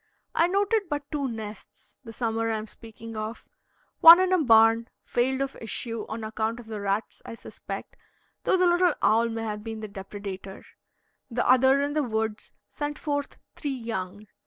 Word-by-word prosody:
I 335 - +3
noted 400 +1 +1
but 290 -1 -2
two 290 -3 -1
nests, 220 -3 -9
the 225 - -9
summer 225 0 -1
I 220 - 0
am 215 - -5
speaking 225 0 -11
of: 215 +2 -6 0.5
one, 335 +2 +11
in 370 0 +2
a 360 -4 +3
barn, 225 -1 +5 0.2
failed 260 +2 0
of 275 0 -2
issue, 230 0 -4
on 220 +1 -5
account 220 +1 -2
of 240 - -11
the 215 -2 -6
rats, 200 +2 -2
I - - -8
suspect, - - -8 0.5
though - - +3
the 365 - +3
little 350 -1 +3
owl 230 +2 +4
may 225 0 -4
have 210 -1 -4
been 225 -1 -6
the 215 - -6
depredator; 195 -1 -8 0.7
the 245 0 -1
other, 265 +2 +5
in 285 +1 -1
the 305 - +1
woods, 220 -4 -3 0.2
sent 295 0 -5
forth 285 -2 -3 0.2
three 285 -3 -3
young. 210 -4 -5
230 Hz, 180 wpm, -26 LUFS, 220-285 Hz, 0.7 s, one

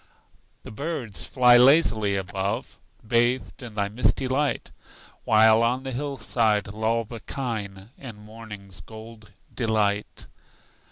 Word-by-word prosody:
The - - -10
birds 115 - -5
fly 125 -2 +5
lazily 120 -6 +4
above, 95 +1 -4 0.3
Bathed 120 +4 0
in 120 -4 -9
thy 100 -1 0
misty 125 +4 0
light, 140 +3 -1 0.5
While 110 +1 +5
on 125 +3 0
the 135 - -5
hillside 120 -6 0
loll 110 +2 -1
the 115 +1 -9
kine 110 -7 -5
In 120 -5 -9
morning's 105 -2 -11
gold 110 -1 -13 0.2
delight. 105 -3 -1
110 Hz, 115 wpm, -25 LUFS, 105-125 Hz, 0.5 s, fly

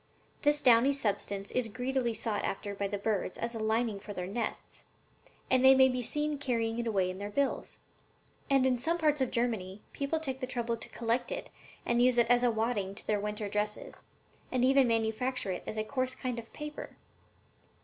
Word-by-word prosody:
This 295 0 +2
downy 250 +3 +6
substance 205 -5 -2
is 250 -2 0
greedily 250 +1 -1
sought 215 -3 -2
after 200 +1 -3
by 200 0 -2
the 205 +1 -3
birds 200 -2 -1
as 235 +1 -3
a 225 - -5
lining 220 -1 0
for 205 +1 -8
their 180 -2 -4
nests, 205 +6 -4 0.6
and 260 0 +3
they 265 0 +9
may 265 0 +6
be 250 -1 -1
seen 295 +4 -1
carrying 230 -4 -1
it 235 - -2
away 190 -4 +1
in 185 - -8
their 205 0 -4
bills. 275 +6 -1 0.7
And 270 -1 +4
in 255 -2 +2
some 330 +7 0
parts 300 -3 +2
of 260 - +2
Germany 215 -5 -2
people 280 +3 -1
take 265 -4 -3
the 255 - -3
trouble 240 -2 -1
to 230 - -7
collect 235 +1 -1
it - - -5 0.3
and 240 0 +2
use 250 0 +4
it 235 - +6
as 245 0 +5
a 245 - +4
wadding 220 -4 -1
to - - -8
their 210 -1 +1
winter 210 0 -3
dresses, 210 +1 -3 0.5
and 255 -1 +2
even 270 0 +5
manufacture 225 0 0
it 180 - -3
into 215 - -2
a - - -2
coarse 255 +2 -2
kind 250 -2 -3
of 230 - -11
paper." 300 0 -7
235 Hz, 200 wpm, -31 LUFS, 210-260 Hz, 0.7 s, they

